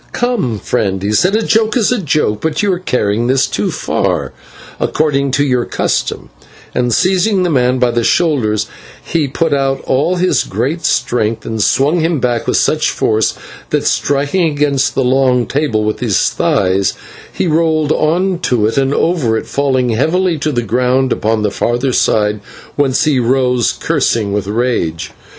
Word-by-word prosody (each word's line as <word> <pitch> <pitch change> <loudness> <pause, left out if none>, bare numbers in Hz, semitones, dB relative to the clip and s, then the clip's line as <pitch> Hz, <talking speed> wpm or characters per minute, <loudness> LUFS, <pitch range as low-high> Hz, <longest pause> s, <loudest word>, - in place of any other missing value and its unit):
"Come, 235 - -1
friend," 95 -2 -2
he 100 - -1
said, 180 - +2
"a 225 - +1
joke 220 +3 +1
is 225 -2 +2
a 250 - +1
joke, 140 - 0
but 160 +3 -1
you 200 -2 +2
are 175 - -3
carrying 115 - -1
this 135 +1 +2
too 105 -6 -2
far, - - -2 0.5
according 140 -3 0
to 145 - +2
your 125 -3 +1
custom," - - -2 0.4
and, 125 -1 0
seizing 190 - +2
the 175 - 0
man 125 -2 +2
by 125 -1 +2
the 120 0 0
shoulders, 115 -10 +1 0.4
he 160 -4 -1
put 160 +3 -1
out 135 -1 0
all 145 +7 0
his 180 -6 +1
great 135 - -3
strength, 115 -2 0
and 110 -1 -3
swung 145 - +2
him 165 -1 0
back 120 -2 -1
with - - +2
such 155 -1 +1
force 110 -1 0 0.3
that, - - -1
striking 145 +6 +1
against 145 -2 0
the 135 - +1
long 125 -1 +2
table 135 -7 -1
with 105 0 -2
his 110 -7 +1
thighs, 95 0 0 0.4
he - - -2
rolled 160 -2 +1
on 175 +4 +1
to 120 -10 0
and 135 +4 0
over 145 -10 +1
it, - - -4
falling 130 -3 0
heavily 165 +10 +1
to 155 +1 -1
the 120 -3 -1
ground 125 +4 +1
upon 110 0 -1
the 105 - 0
farther 120 +5 -1
side, 105 -2 +1 0.4
whence 135 -2 +1
he 145 -4 +2
rose 125 -1 +1
cursing 105 -3 -1
with 100 -2 -2
rage. 105 -8 -2
135 Hz, 170 wpm, -14 LUFS, 115-155 Hz, 0.5 s, said